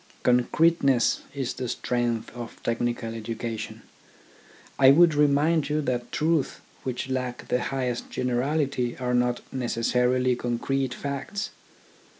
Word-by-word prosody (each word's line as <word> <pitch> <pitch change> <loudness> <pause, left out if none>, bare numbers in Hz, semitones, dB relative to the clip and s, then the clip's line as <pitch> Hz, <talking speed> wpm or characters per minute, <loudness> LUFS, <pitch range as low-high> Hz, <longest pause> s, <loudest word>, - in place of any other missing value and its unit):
Concreteness 135 +1 +3
is 135 -3 -2
the 130 - -4
strength 120 -2 -1
of 120 -2 -7
technical 120 0 -1
edu 115 0 -5
cation. 115 -2 -5 1.0
I 135 -1 +8
would 165 +3 +7
remind 150 +1 +3
you 150 +1 +1
that 125 -4 -2
truths 155 -2 0 0.2
which 130 0 -3
lack 125 -2 -3
the 125 - +1
highest 125 -3 -2
generality 125 0 0
are 125 -1 -1
not 125 0 +1
necessarily 125 0 +1
concrete 125 +2 -1
facts. 140 +9 -4
125 Hz, 120 wpm, -26 LUFS, 120-140 Hz, 1.0 s, I